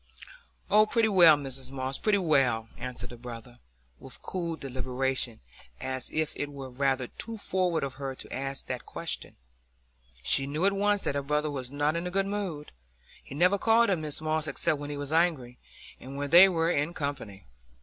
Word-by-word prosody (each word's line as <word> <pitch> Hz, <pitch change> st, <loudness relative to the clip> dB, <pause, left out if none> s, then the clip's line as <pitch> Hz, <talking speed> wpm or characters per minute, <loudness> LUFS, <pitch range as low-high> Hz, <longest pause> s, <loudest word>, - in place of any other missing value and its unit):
"Oh, 215 Hz, +1 st, +5 dB
pretty 225 Hz, 0 st, +2 dB
well, 170 Hz, -6 st, +7 dB
Mrs 135 Hz, -2 st, -4 dB
Moss, 130 Hz, 0 st, -3 dB
pretty 210 Hz, -2 st, +2 dB
well," 130 Hz, -, +2 dB
answered 125 Hz, 0 st, -5 dB
the 120 Hz, -, -10 dB
brother, 120 Hz, 0 st, -10 dB, 0.4 s
with -, -, -11 dB
cool 170 Hz, -3 st, -3 dB
deliberation, 130 Hz, -3 st, -2 dB, 0.4 s
as 130 Hz, 0 st, -3 dB
if 155 Hz, -1 st, -1 dB
it 145 Hz, -, -4 dB
were 135 Hz, -2 st, -8 dB
rather 135 Hz, 0 st, 0 dB
too 225 Hz, -, -6 dB
forward 185 Hz, -5 st, 0 dB
of 135 Hz, -1 st, -3 dB
her 135 Hz, -1 st, -4 dB
to -, -, -9 dB
ask 135 Hz, +1 st, -2 dB
that -, -, -5 dB
question. -, -, -3 dB, 0.9 s
She 135 Hz, -, +5 dB
knew 150 Hz, +6 st, -1 dB
at 200 Hz, -, +3 dB
once 205 Hz, 0 st, +1 dB
that -, -, 0 dB
her 140 Hz, -, -1 dB
brother 150 Hz, +2 st, -1 dB
was 130 Hz, -3 st, -5 dB
not 145 Hz, +2 st, 0 dB
in 170 Hz, +1 st, -2 dB
a -, -, -2 dB
good 195 Hz, +2 st, 0 dB
humour; 195 Hz, -7 st, -4 dB, 0.6 s
he -, -, -10 dB
never 180 Hz, +6 st, +3 dB
called 230 Hz, +1 st, +4 dB
her 195 Hz, -, +3 dB
Mrs 155 Hz, -2 st, -3 dB
Moss 155 Hz, 0 st, -1 dB
except 140 Hz, +1 st, 0 dB
when 145 Hz, 0 st, -6 dB
he 145 Hz, -, -4 dB
was 145 Hz, +1 st, -4 dB
angry, 155 Hz, -8 st, +1 dB, 0.4 s
and 135 Hz, +2 st, -9 dB
when 145 Hz, 0 st, -3 dB
they 180 Hz, +3 st, +9 dB
were 165 Hz, -1 st, +1 dB
in 150 Hz, +2 st, -1 dB
company. 125 Hz, -, -5 dB
145 Hz, 190 wpm, -28 LUFS, 130-175 Hz, 0.9 s, they